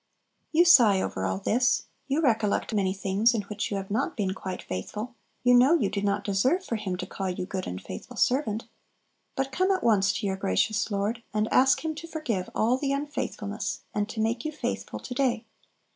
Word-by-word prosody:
You 335 +2 +5
sigh 230 - +7
over 95 - -2
all 95 0 -1
this; 240 - +2 0.2
you 285 +3 +1
recollect 225 -4 +1
many 195 -3 +1
things 200 +4 +2
in 210 - -1
which 205 0 -4
you 200 - -2
have 195 0 -6
not 250 +6 -1
been 195 -3 0
quite 190 -1 -6
faithful; 210 - -5 0.3
you 245 0 +5
know 255 +7 +6
you 210 - +1
do 200 - -2
not 200 0 0
deserve 260 - +1
for 230 - -2
Him 190 -4 -3
to - - -4
call 195 -1 -4
you 180 0 -3
"good 190 0 -4
and 90 - -4
faithful 90 - -9
servant." 235 -4 +1 0.7
But 270 0 -1
come 370 +7 +1
at 375 -2 +1
once 205 -3 +4
to 225 - -3
your 190 -1 -1
gracious 200 - +1
Lord, 205 +3 -1
and 215 +1 +2
ask 265 +5 +4
Him 315 - -1
to 335 +2 -8
forgive 290 - -3
all 240 +4 +2
the 275 -1 -1
unfaithfulness, 275 -7 -3
and 205 0 -1
to 220 - -6
make 230 +2 0
you 310 - -2
faithful 300 - -4
to 250 - -7
day. 250 -3 0
220 Hz, 205 wpm, -27 LUFS, 195-260 Hz, 0.7 s, sigh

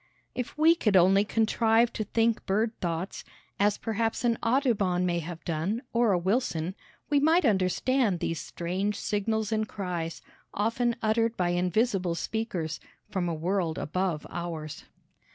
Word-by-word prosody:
If 250 +2 -5
we 320 +2 +6
could 215 - +1
only 190 +3 +5
contrive 225 +2 +2
to 215 - -2
think 225 +2 +1
bird 215 +4 +1
thoughts, 170 +2 -3 0.4
as 205 0 +3
perhaps 225 +1 -1
an 235 -1 +3
Audubon 225 -8 +2
may 175 -1 +1
have 170 0 -7
done, 175 - -2
or 235 -2 +3
a 185 - +3
Wilson, 185 -3 0 0.4
we 290 - +5
might 320 +4 +4
understand 205 +1 +2
these 165 -1 -2
strange 190 +4 -2
signals 215 +1 -1
and 215 -1 0
cries, 175 -5 -4 0.3
often 230 +3 +1
uttered 225 +1 +1
by 180 -1 +1
invisible 180 +1 +1
speakers 180 -7 -3 0.3
from 180 -3 -1
a 165 - -2
world 170 0 -1
above 180 -1 -2
ours. 165 -3 -5
200 Hz, 145 wpm, -28 LUFS, 175-230 Hz, 0.4 s, we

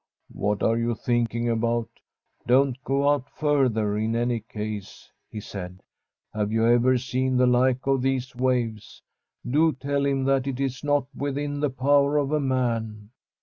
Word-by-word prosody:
* - - -52
What 105 0 -1
are 115 +1 +2
you 120 0 0
thinking 120 0 -1
about? 115 0 0 0.6
Don't 130 +1 +2
go 140 +1 +1
out 145 -2 +1
further 125 -9 +1
in 110 +1 -1
any 120 0 0
case/ 105 -2 -7 0.2
he 110 - -6
said. 95 -2 -8 0.2
* - - -56
Have 105 -1 -1
you 115 0 +2
ever 120 +2 +4
seen 130 +1 -1
the 125 - +4
like 125 +1 +2
of 135 -1 +2
these 130 -1 -1
waves? 120 -4 -2 0.4
Do 155 +5 +3
tell 140 +2 -2
him 135 -1 0
that 135 0 +1
it 135 -2 -3
is 135 0 -2
not 145 -2 +1
within 145 +1 -3
the 145 0 +1
power 140 +2 +2
of 145 -1 0
man.' 115 -5 -2
125 Hz, 165 wpm, -25 LUFS, 115-135 Hz, 0.6 s, ever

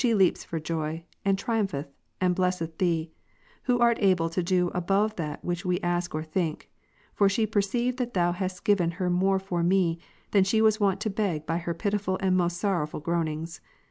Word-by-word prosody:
3, 240 -4 +3
leaps 190 -3 +3
for 165 - -4
joy, 160 0 -3 0.2
and 195 -1 +2
triumpheth, 195 -10 -1 0.3
and 180 -1 +2
blesseth 180 -3 -1
Thee, 165 -3 0 0.5
Who 245 -2 +3
art 235 -1 +4
"^^^ - - -8
able 175 -4 +3
to 180 - 0
do 180 0 +1
above 195 +5 +1
that 155 -3 -4
ivhich 175 -1 -2
ive 180 - +1
ask 175 -1 -1
or 155 - -2
think; 160 0 -3 0.4
for 200 -1 +4
she 220 +3 +1
per 215 -1 +1
ceived 240 +5 -1
that 245 -3 -3
Thou 175 -1 +3
hadst 185 0 -4
given 185 -5 +3
her 180 -1 0
more 190 +2 +3
for 190 -2 -2
me, 170 -1 +2 0.3
than 200 -2 +5
she 205 +4 +2
was 220 0 +4
wont 200 -3 +1
to 215 - -1
beg 190 -7 -1
by 165 +2 -1
her 170 0 -3
pitiful 200 0 -1
and 190 -1 +2
most 175 -1 +1
sorrowful 175 -7 -1
groanings. 165 0 -2
180 Hz, 205 wpm, -27 LUFS, 170-200 Hz, 0.5 s, than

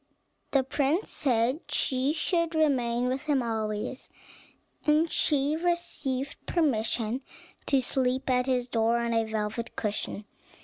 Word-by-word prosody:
The 275 -2 +3
prince 285 +7 0
said 255 0 +1
she 260 +2 +1
should 335 +1 0
remain 250 -6 +2
with 260 +3 -2
him 285 -4 +2
always, 220 +2 -3 0.8
and 310 +2 +4
she 290 0 +2
received 315 -6 -2
permission 240 -6 +1 0.5
to 270 -2 +3
sleep 255 0 0
at 250 0 +2
his 250 -2 +1
door, 230 -1 +2
on 235 0 0
a 225 0 +2
velvet 220 +1 -3
cushion. 210 -1 -3
260 Hz, 125 wpm, -28 LUFS, 235-295 Hz, 0.8 s, and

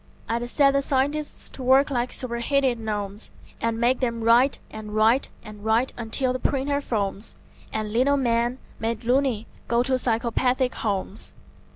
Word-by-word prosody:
I'd 235 +1 -2
set 275 +1 +4
the 275 - +3
scientists 285 +2 0
to - - -10
work 265 +3 +4
like 245 -1 -1
superheated 255 0 +1
gnomes, 210 -1 -3 0.3
And 230 0 -1
make 245 +2 +2
them 235 -3 -1
write 240 +4 +5
and 215 -1 -7
write 225 +5 +3
and 210 -1 -11
write 225 +4 +1
until 240 +3 0
the 255 - -3
printer 280 +2 0
foams 205 -4 -1 0.4
And 215 -1 -3
lino 270 +4 +3
men, 240 -1 +1 0.2
made 225 +1 -2
"loony", 250 -2 +1 0.2
go 235 +1 +2
to 260 0 +1
psychopathic 250 +2 +1
homes. 200 -1 -3
240 Hz, 155 wpm, -25 LUFS, 225-265 Hz, 0.4 s, write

